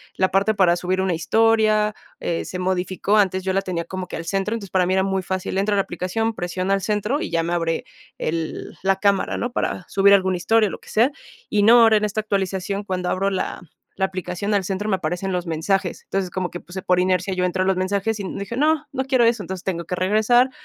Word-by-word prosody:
la 185 0 +1
parte 200 +3 +2
para 180 -3 +4
subir 185 +1 -1
una 190 -2 +1
historia, 215 +2 +2 0.2
eh, 170 - -2
se 180 - -5
modificó, 185 +2 0
antes 190 -2 +2
yo 190 - 0
la 195 - +2
tenía 175 -3 -3
como 185 0 -5
que - - -5
al 165 - -6
centro, 195 +5 -1
entonces 200 -4 -7
para 185 -1 +3
mí 185 - -1
era 190 0 +3
muy 190 -1 -1
fácil, 185 +1 -3
entro 205 +1 +1
a - - +2
la 195 - +3
aplicación, 205 +6 -2
presiona 185 +2 -2
al 195 - -2
centro, 210 +8 -1
y - - -3
ya 165 0 +1
me 170 +1 -2
abre 165 -1 -1 0.3
el 160 0 -3
el - - -25
la 195 0 +2
cámara, 200 0 +1
¿no?, 240 +1 -3
para 180 - -2
subir 200 0 +5
algún 190 -1 +3
historia, 215 +5 +3
eh, - - -5
lo - - -7
que - - -16
sea, 235 +5 +3 0.4
y 205 -1 +2
no, 235 +2 +7
ahora 220 -1 +6
en 210 - -1
esta 210 +1 -2
actualización 195 -1 -2
cuando 185 -2 -2
abro 195 +1 +1
la 190 - -3 0.4
la 190 - +3
aplicación 185 +2 -3
al 200 -2 +2
centro, 195 +3 -3
me 190 - +2
aparecen 180 +3 -3
los 180 -1 -2
mensajes, 175 +3 -1
entonces, 195 -2 -2
como 185 -1 -3
que, 175 - -6
pues, 175 - -14
eh, 190 - -4
por 180 0 +2
inercia, 185 +1 +1
yo 180 0 0
entro 185 +1 0
a - - -1
los 190 -1 +1
mensajes 200 +3 -1
y - - -4
dije: 200 +4 -5
"No, 305 +1 +2
no 265 -1 -2
quiero 255 -3 +3
eso", 230 -2 +2
entonces, 190 0 -6
tengo 170 -3 -3
que 180 - -3
regresar, 220 +7 +3
190 Hz, 250 wpm, -22 LUFS, 180-210 Hz, 0.4 s, no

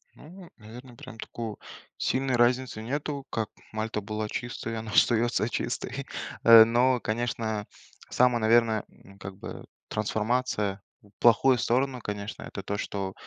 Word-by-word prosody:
Ну, 175 +3 -13
наверно, 120 +3 -12
прям 115 - -11
такой 110 -1 -6 0.4
сильной 130 -1 0
разницы 120 -1 +2
нету, 140 +3 -4
как 110 -2 -2 0.2
Мальта 110 0 -3
была 105 +1 -4
чистой 120 0 -5
и - - -3
она 110 -1 -5
остается 120 0 +3
чистой. - - -3 0.4
Э, 115 -1 +10
но, 125 +2 +3
конечно, 110 -2 -2 0.4
самая, 125 -1 +3
наверное, 110 -1 +3
ну, 100 +1 -18
как 95 0 -9
бы, - - -8 0.2
трансформация 110 -2 -1 0.2
в 105 - -21
плохую 120 +3 +5
сторону, 125 +2 0
конечно- 105 0 -5
это 100 - -7
то, 100 +2 -3
что 95 -2 -4
115 Hz, 140 wpm, -27 LUFS, 105-125 Hz, 0.4 s, Э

